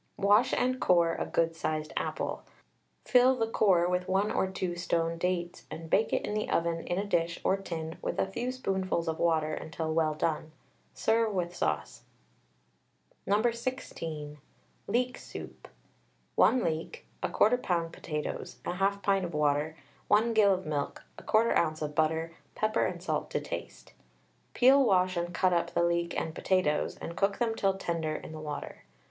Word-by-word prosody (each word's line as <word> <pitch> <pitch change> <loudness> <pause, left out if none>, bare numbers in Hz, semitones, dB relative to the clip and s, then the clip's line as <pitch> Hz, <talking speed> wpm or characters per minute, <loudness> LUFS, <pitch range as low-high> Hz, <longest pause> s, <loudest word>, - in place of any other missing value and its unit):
Wash 205 +4 +4
and 255 +1 +1
core 170 -2 +4
a - - -3
good 165 0 +1
sized 155 -1 -3
apple, - - -2 0.6
fill 255 +1 +5
the 230 -3 +1
core 190 -6 +3
with 180 +1 -1
1 195 +3 +1
or - - +1
2 185 -2 -3
stoned 165 -1 -1
dates, 175 -1 -2
and 165 0 -8
bake 220 - +3
it - - 0
in - - -3
the 215 0 -2
oven 165 0 +1
in 175 - -1
a 200 - -1
dish 170 -4 0
or 190 - +3
tin 165 -4 -6
with - - -3
a - - +2
few 235 +6 -3
spoonfuls 190 -9 -1
of 160 0 -2
water 160 -2 +2
until 160 +1 -3
well 155 -1 +1
done. 155 0 -1 0.4
Serve 225 0 +2
with 175 -3 -2
sauce. - - -2 1.3
No. 205 +2 +3
16. 165 - -3 0.5
LEEK 250 +1 0
SOUP. - - -9 0.7
1 255 - +4
leek, 165 - -3 0.2
1/4 245 +3 +3
lb. 170 -6 0
potatoes, 150 -2 -5
1/2 195 +2 0
pint 195 -3 +1
water, 150 0 +1 0.3
1 225 +3 +3
gill 205 -3 +5
of 185 - -7
milk, 145 -2 -3 0.2
1/4 225 +1 +2
oz. 155 -2 +1
of 150 0 -3
butter, 160 +2 0 0.2
pepper 215 0 +1
and - - -6
salt - - -2
to - - -1
taste. - - -7 0.6
Peel, 270 +2 +6
wash, 185 -5 +3
and 175 0 -2
cut 180 +1 +2
up 170 0 0
the 170 - +3
leek 170 0 0
and 160 - -4
potatoes, 180 -6 +1
and 170 - -7
cook 195 +2 +1
them 235 -2 +1
till 195 -3 +1
tender 165 -4 -2
in - - -7
the 155 - -7
water. 150 -1 -6
175 Hz, 165 wpm, -30 LUFS, 160-205 Hz, 1.3 s, Peel